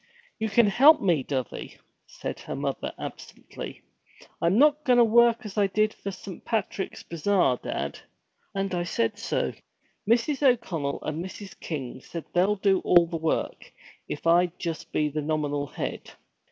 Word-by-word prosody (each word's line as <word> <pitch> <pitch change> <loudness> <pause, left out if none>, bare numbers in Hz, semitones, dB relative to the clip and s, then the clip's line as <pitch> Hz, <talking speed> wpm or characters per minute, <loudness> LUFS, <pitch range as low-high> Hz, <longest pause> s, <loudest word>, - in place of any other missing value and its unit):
'You 220 0 -1
can 230 +3 +5
help 275 +10 +6
me, 175 -7 +2
dovey,' 130 -3 -4 0.3
said - - -6
her - - -6
mother - - -3
absently. - - -8 0.6
'I'm 170 +5 +3
not 295 +2 +5
goin' 250 -4 +4
to 240 - +8
work 235 +1 +4
as 210 0 -3
I 200 - +4
did 215 +2 +1
for 200 - -6
Saint 190 -1 -9
Patrick's 215 -3 -3
Bazaar, 170 -5 +1
dad, - - -4 0.6
and 195 -1 -1
I 175 - 0
said 210 +4 -1
so! 225 - -1 0.6
Mrs. 240 +5 +2
O'Connell 190 - +1
and 155 +2 -3
Mrs. 195 +1 -9
King 135 -5 -5
said 170 +3 -7
they'd 195 +3 +2
do 195 -2 +4
all 175 -1 +5
the 165 0 -4
work, 160 0 -2 0.4
if 150 - -6
I'd 175 +1 +3
just 165 -3 -5
be 150 - +1
the 150 +1 -3
nominal 145 -1 -1
head. - - -5
190 Hz, 160 wpm, -26 LUFS, 160-220 Hz, 0.6 s, to